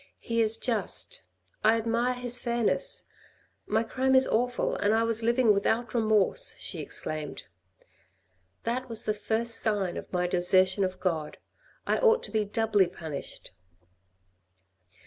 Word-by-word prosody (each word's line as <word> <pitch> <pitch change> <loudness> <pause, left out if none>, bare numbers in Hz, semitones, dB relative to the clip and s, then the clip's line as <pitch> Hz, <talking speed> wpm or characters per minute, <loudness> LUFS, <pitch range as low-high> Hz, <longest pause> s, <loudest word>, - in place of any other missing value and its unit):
" - - -49
He 230 0 +2
is 220 0 +2
just. 245 - +1 0.4
I 220 +1 +4
admire 235 +2 -1
his 245 0 0
fairness. 235 -2 -1 0.6
My 220 +1 +1
crime 260 +3 0
is 260 0 +7
awful, 245 +2 -1
and 205 +2 +1
I 225 - +2
was 230 0 +1
living 235 -1 +3
without 225 +4 -1
remorse," 220 - +1
she - - -4
exclaimed. 155 -1 -5 1.2
"That 250 +2 -3
was 225 -1 -2
the 215 - 0
first 225 +2 +1
sign 205 -5 -1
of - - -9
my 180 -1 0
desertion 185 +2 +3
of 185 -1 -3
God: 160 -5 -3 0.5
I - - 0
ought 465 -1 +3
to - - -6
be 220 -1 0
doubly 210 -2 +1
punished." 160 -5 -8
225 Hz, 145 wpm, -27 LUFS, 200-240 Hz, 1.2 s, is